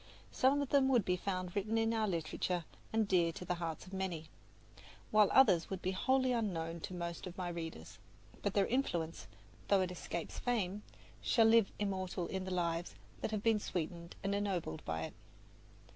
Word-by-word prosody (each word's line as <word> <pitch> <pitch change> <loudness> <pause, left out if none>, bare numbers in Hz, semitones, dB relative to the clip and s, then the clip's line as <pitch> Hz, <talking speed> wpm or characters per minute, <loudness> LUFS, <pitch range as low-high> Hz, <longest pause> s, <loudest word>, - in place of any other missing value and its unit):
Some 280 +2 +3
of 275 - -6
them 275 -2 +4
would 245 -7 +4
be 180 - +2
found 185 -1 -3
written 210 +3 0
in 225 0 +2
our 220 -1 +1
literature 175 0 -1 0.3
and 220 -1 +2
dear 175 -4 +3
to 180 - -7
the 180 - 0
hearts 165 0 -3
of 190 - -12
many, 175 -5 -3 0.8
while 215 -2 +6
others 190 -11 +5
would 190 - -3
be 185 - +1
wholly 260 +6 +2
unknown 170 -8 -1
to 180 - -6
most 170 0 -4
of 180 +2 -9
my 180 -2 -2
readers. 165 - -6 0.4
But 200 - -1
their 200 -1 +4
influence, 170 -11 -1 0.4
though 200 -2 +4
it 185 -1 -1
escapes 170 -1 -5
fame, 210 -5 0 0.4
shall 230 -2 +4
live 225 -2 +5
immortal 190 -3 -2
in 190 +1 -3
the 185 - -4
lives 170 -1 -1 0.3
that - - -1
have 215 -1 -2
been 225 -2 +4
sweetened 170 -2 -4
and 195 0 0
ennobled 190 - -1
by 80 0 -2
it. - - -5
185 Hz, 185 wpm, -35 LUFS, 170-215 Hz, 0.8 s, while